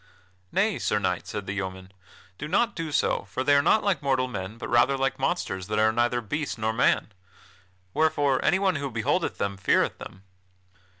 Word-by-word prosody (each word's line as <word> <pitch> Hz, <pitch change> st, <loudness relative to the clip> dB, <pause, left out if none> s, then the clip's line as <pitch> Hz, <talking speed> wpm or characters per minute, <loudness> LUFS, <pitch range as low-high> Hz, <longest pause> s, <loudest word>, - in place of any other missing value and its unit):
"Nay, 205 Hz, +1 st, +1 dB
Sir 105 Hz, -, 0 dB
Knight," 90 Hz, -3 st, -1 dB
said 105 Hz, -2 st, -5 dB
the 95 Hz, -, -4 dB
yeoman, 95 Hz, -1 st, -5 dB, 0.5 s
"do 150 Hz, -, -4 dB
not 200 Hz, +5 st, +1 dB
do 165 Hz, -3 st, -4 dB
so, 120 Hz, -, +1 dB
for 130 Hz, +7 st, -3 dB
they 145 Hz, -, +4 dB
are 140 Hz, -, +6 dB
not 215 Hz, +9 st, +3 dB
like 200 Hz, -3 st, +1 dB
mortal 130 Hz, -2 st, +1 dB
men, 105 Hz, -3 st, -6 dB
but -, -, -6 dB
rather 120 Hz, +3 st, +3 dB
like 135 Hz, 0 st, -1 dB
monsters 95 Hz, -, -2 dB
that 105 Hz, 0 st, -2 dB
are 110 Hz, 0 st, +4 dB
neither 120 Hz, +1 st, +1 dB
beast 145 Hz, +7 st, -3 dB
nor 110 Hz, 0 st, -1 dB
man. 115 Hz, -1 st, +2 dB, 0.8 s
Wherefore 145 Hz, -4 st, +2 dB
anyone 190 Hz, -2 st, +2 dB
who 140 Hz, -1 st, -3 dB
beholdeth 135 Hz, +10 st, -1 dB
them, 100 Hz, -1 st, -2 dB
feareth 95 Hz, -, +1 dB
them." 95 Hz, -, -10 dB
130 Hz, 185 wpm, -26 LUFS, 105-150 Hz, 0.8 s, are